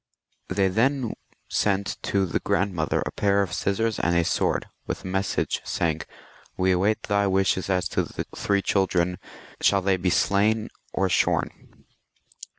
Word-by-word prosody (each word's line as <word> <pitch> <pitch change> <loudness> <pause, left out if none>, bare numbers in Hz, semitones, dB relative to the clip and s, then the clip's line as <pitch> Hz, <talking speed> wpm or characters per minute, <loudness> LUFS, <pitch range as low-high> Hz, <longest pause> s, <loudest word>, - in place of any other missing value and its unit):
They 95 +1 +1
then 120 +5 +1 0.3
sent 100 -1 0
to 100 -1 +1
the 90 - -1
grandmother 90 -4 0
a - - -3
pair 100 0 +2
of 90 - -5
scissors 110 +2 0
and 85 0 +1
a 85 -1 +3
sword, - - 0 0.2
with - - -4
a - - -6
message, 95 +1 -1
saying, 80 -2 -1 0.3
" - - -27
"We 95 0 +2
await 100 +4 +1
thy 100 -1 +1
wishes 95 0 +1
as 90 -1 +1
to - - +1
the - - -5
three 100 -1 0
children; 90 -2 +1 0.4
shall 100 -1 +3
they 95 0 +2
be 90 0 0
slain 105 +4 +2 0.2
or 95 - +1
shorn 90 - -1
95 Hz, 155 wpm, -25 LUFS, 90-100 Hz, 0.4 s, a